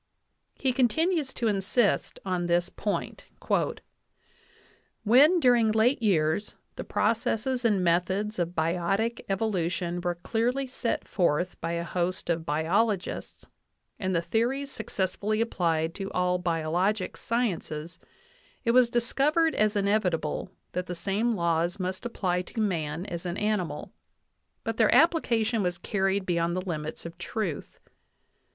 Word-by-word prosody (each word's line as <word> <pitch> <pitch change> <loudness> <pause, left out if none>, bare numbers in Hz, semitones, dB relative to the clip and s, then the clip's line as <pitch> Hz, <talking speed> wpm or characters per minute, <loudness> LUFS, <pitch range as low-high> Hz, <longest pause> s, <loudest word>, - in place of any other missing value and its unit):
He 260 -2 0
continues 300 +4 +1
to 235 - 0
insist 205 +2 +1
on 180 -2 -1
this 175 +1 +2
point: 205 - -3 1.8
"When, 280 - +6
during 240 -6 +4
late 225 +4 +3
years, 180 -2 +1 0.2
the - - -5
processes 235 +3 0
and 205 -5 +2
methods 190 +4 +1
of 175 0 -1
biotic 180 +8 0
evolution 180 -4 -1
were 175 0 -1
clearly 240 +9 -1
set 250 -2 -2
forth 175 -1 0
by 165 +1 -2
a 170 0 -1
host 175 +1 -1
of 165 -1 -2
biologists, 180 +6 -1 0.5
and 185 -1 -1
the 170 - +1
theories 265 +8 0
suc 220 - -6
cessfully 205 +3 -1
applied 165 -7 0
to 195 +1 -5
all 180 0 +1
biologic 180 +4 0
sciences, 175 -8 -2 0.7
it 230 - +4
was 250 -1 +5
discovered 290 +7 +2
as 215 0 +2
inevitable 195 -6 0 0.2
that 180 0 -3
the 180 - -4
same 210 +6 0
laws 170 +1 0
must 185 +5 -3
apply 180 -6 -1
to 185 - -7
man 170 -5 -1
as 170 -4 -5
an 175 +2 -3
animal. 210 -5 -2 0.7
But - - -3
their - - +4
application 235 -9 +3
was 180 -2 -1
carried 195 -1 0
beyond 170 -1 0
the 185 - -1
limits 155 -3 -4
of 170 +1 -8
truth. 175 -3 -4
195 Hz, 130 wpm, -27 LUFS, 175-230 Hz, 1.8 s, When